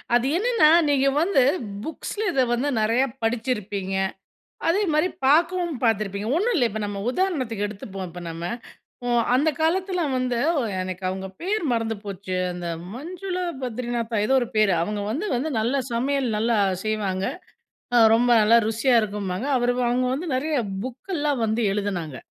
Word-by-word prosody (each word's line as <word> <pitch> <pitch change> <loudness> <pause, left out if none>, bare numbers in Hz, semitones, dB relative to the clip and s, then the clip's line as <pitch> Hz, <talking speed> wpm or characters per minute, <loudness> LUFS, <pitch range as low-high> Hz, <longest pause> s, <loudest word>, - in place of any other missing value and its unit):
அது 245 +2 +2
என்னன்னா 455 -7 +4 0.2
நீங்க 275 -1 +3
வந்து 340 -5 +3 0.4
புக்ஸ்ல 405 - -5
இத 270 - +2
வந்து 260 +5 0
நிறையா 230 +5 +3 0.2
படிச்சிருப்பீங்க. 210 -5 -2 0.7
அதேமாரி 340 -2 +2 0.2
பார்க்கவும் 335 +1 +3
பார்த்துருப்பிங்க. 210 -1 0
ஒண்ணும் 450 +7 +1
இல்ல 245 - +3
இப்ப 220 - -4
நம்ம 200 -1 -4
உதாரணத்துக்கு 255 - -1
எடுத்துப்போம் 195 -2 -7
இப்ப 175 +1 -9
நம்ம. 165 +1 -6 0.9
அந்த 290 +5 +3
காலத்தில 360 +2 +1 0.2
வந்து 250 -2 -1 0.4
எனக்கு 185 0 -5
அவங்க 190 0 -4
பேர் 405 +2 -1
மறந்து 225 -1 0
போச்சு 195 -2 -5 0.2
அந்த 175 -1 -5 0.3
மஞ்சுளா 360 +7 -4 0.2
பத்ரிநாத்தா 240 -2 -2
ஏதோ 265 - +3
ஒரு 240 - -1
பேர் 215 -2 +4
அவங்க 210 +3 -2
வந்து 300 - -2
வந்து 265 +6 -1
நல்லா 245 +5 +1
சமையல 260 0 0
நல்லா 230 +1 +1 0.3
செய்வாங்க. 200 -3 -1 0.9
ரொம்ப 240 +2 +3
நல்லா 225 +2 +6
ருசியா 230 +3 +2
இருக்கும்பாங்க. 205 +1 -3
அவர் 245 0 +2 0.2
அவங்க 250 +1 +1
வந்து 325 +6 -4
நிறைய 305 +4 -1 0.3
புக்கெல்லாம் 290 0 -2
வந்து 220 +2 0
எழுதினாங்க. 190 -8 -3
240 Hz, 140 wpm, -24 LUFS, 210-300 Hz, 0.9 s, நல்லா